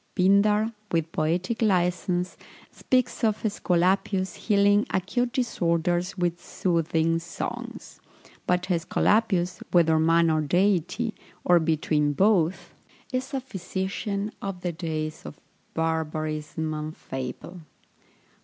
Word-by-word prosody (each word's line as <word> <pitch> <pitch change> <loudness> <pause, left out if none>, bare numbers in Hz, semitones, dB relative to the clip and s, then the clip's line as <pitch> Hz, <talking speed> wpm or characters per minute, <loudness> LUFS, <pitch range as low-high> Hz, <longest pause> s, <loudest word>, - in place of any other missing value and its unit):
Pindar, 210 +4 +3 0.2
with 165 -1 0
poetic 175 +9 -1
licence, 180 -2 +1 0.4
speaks 255 -2 0
of 215 -2 +1
Æsculapius 190 -1 +1
healing 205 -1 +3
acute 240 +7 0
disorders 175 - 0
with 175 -1 -1
soothing 165 -2 0
songs; 165 0 -7 0.5
but 180 0 +2
Æsculapius, 185 +1 +1
whether 160 -2 +4
man 165 +1 +4
or 155 0 +2
deity, 190 +7 +1 0.3
or 175 -1 +6
between 155 -2 +1
both, 190 -1 +2 0.4
is 255 +1 -2
a - - +1
physician 200 -2 -3
of 195 -3 -5
the 175 - -1
days 155 -2 -4
of - - -10 0.4
barbarism 155 -1 -2
and 155 0 -5
fable. 130 +7 -6
180 Hz, 105 wpm, -26 LUFS, 160-200 Hz, 0.5 s, or